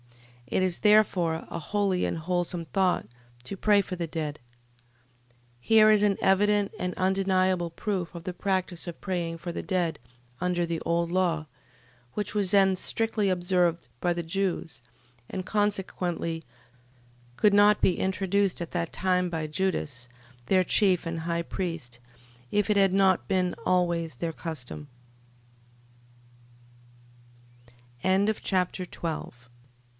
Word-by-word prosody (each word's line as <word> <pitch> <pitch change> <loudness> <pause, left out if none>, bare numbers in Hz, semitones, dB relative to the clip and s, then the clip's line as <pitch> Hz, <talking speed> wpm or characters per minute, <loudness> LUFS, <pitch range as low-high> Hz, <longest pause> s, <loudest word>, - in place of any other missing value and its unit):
It 185 - +1
is 185 -2 +1
therefore 190 -6 +3
a 170 - -4
holy 195 +1 0
and - - -2
wholesome 175 +1 -2
thought 185 +5 +1 0.4
to 200 - -6
pray 205 +1 +4
for 190 - -5
the 170 -2 -3
dead... 155 -2 -4 1.2
Here 215 - +6
is 210 -1 +4
an 205 -2 +3
evident 205 +1 +3
and 180 0 -2
undeniable 185 -2 +1
proof 180 0 -3
of 170 - -7
the 185 - -3
practice 185 -2 -2
of 170 - -7
praying 170 -3 -3
for 175 +1 -6
the - - -3
dead 180 -4 -1 0.4
under 180 -1 +1
the 165 -1 -3
old 170 0 0
law, 175 -4 +1 0.7
which 210 - -2
was 200 -3 0
then 195 -2 +5
strictly 220 +1 0
observed 175 -3 +1
by 175 - +1
the 170 0 -2
Jews, 165 - -2 0.5
and 185 -1 -4
consequently 185 -5 -1 0.9
could 210 +5 +4
not 205 +1 +6
be 180 - +2
introduced 190 0 0
at 170 - -5
that 170 -2 -2
time 180 -1 +1
by 160 -2 -3
Judas, 150 -7 -2 0.4
their 185 -1 +4
chief 190 -4 +3
and 165 -1 -3
high 170 +1 -1
priest, 165 -11 -4 0.5
if 205 - +1
180 Hz, 115 wpm, -27 LUFS, 170-195 Hz, 1.2 s, Here